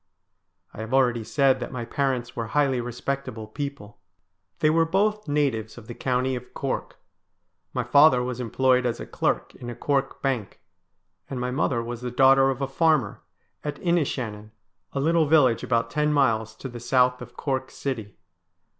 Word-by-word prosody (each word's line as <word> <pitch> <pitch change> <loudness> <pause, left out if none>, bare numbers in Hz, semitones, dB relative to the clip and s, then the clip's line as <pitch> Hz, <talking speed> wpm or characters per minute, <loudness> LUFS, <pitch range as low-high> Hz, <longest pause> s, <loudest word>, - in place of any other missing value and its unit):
I - - -11
have 110 +4 -2
already 120 -3 +3
said 135 +3 +2
that - - -5
my 120 -3 -4
parents 130 -2 -1
were 115 -1 -3
highly 135 0 +1
respectable 125 -1 -4
people. 110 -4 -7 0.6
They 155 - +3
were 165 +1 +4
both 205 +5 0
natives 135 -7 0
of - - -11
the 120 - -7
county 130 +1 0
of 125 0 -9
Cork. 135 -1 -3 0.7
My 125 - -1
father 135 0 +5
was 125 0 -4
employed 125 +1 +2
as 120 -1 -2
a - - -5
clerk - - -1
in 120 - -9
a 120 - -6
Cork 140 +1 -1
bank; 125 -7 -2 0.7
and 130 - -4
my 125 0 -2
mother 125 -3 0
was 120 0 -6
the 125 - -3
daughter 135 +2 +5
of 135 0 -2
a - - 0
farmer 140 -6 +1 0.4
at 145 -1 -4
Inishannon, 130 - -1 0.4
a 140 - -3
little 160 +2 +3
village 135 -7 +4
about 115 -2 0
ten 150 0 +1
miles 110 -6 +1
to 135 - -7
the 120 -2 -8
south 125 +1 +2
of 125 0 -11
Cork 130 -2 -2
city. 110 -7 -5
130 Hz, 170 wpm, -25 LUFS, 120-140 Hz, 0.7 s, father